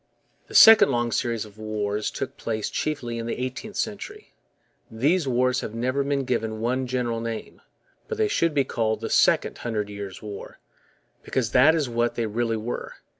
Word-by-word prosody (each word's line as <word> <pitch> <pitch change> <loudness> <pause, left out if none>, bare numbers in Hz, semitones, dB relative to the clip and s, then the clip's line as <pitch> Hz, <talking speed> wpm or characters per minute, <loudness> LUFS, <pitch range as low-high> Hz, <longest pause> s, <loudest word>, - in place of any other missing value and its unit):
The - - -11
second 225 0 +9
long 120 -1 0
series 115 -2 -1
of 105 0 -16
wars 105 -1 -2
took 135 0 -5
place 110 -2 -3
chiefly 125 -6 -3
in 115 - -4
the - - -3
eighteenth 130 - -5
century. 315 - -5 0.6
These 145 +8 +1
wars 125 0 +2
have 110 - -6
never 130 +4 0
been 140 -1 -1
given 115 -3 -2
one 125 +3 -1
general 120 -2 -1
name; 115 -1 -6 0.5
but 450 - -4
they 435 -1 +2
should 165 - +1
be 140 - +4
called 110 -4 -1
the - - -4
Second - - +3
Hundred 105 -3 -3
Years' 100 -2 -7
War, 105 -2 -9 0.6
because 120 -5 -2
that 145 +6 +6
is 150 -4 0
what 120 0 0
they 115 - -1
really 115 +1 -1
were. 115 +3 -5
120 Hz, 175 wpm, -25 LUFS, 110-135 Hz, 0.6 s, second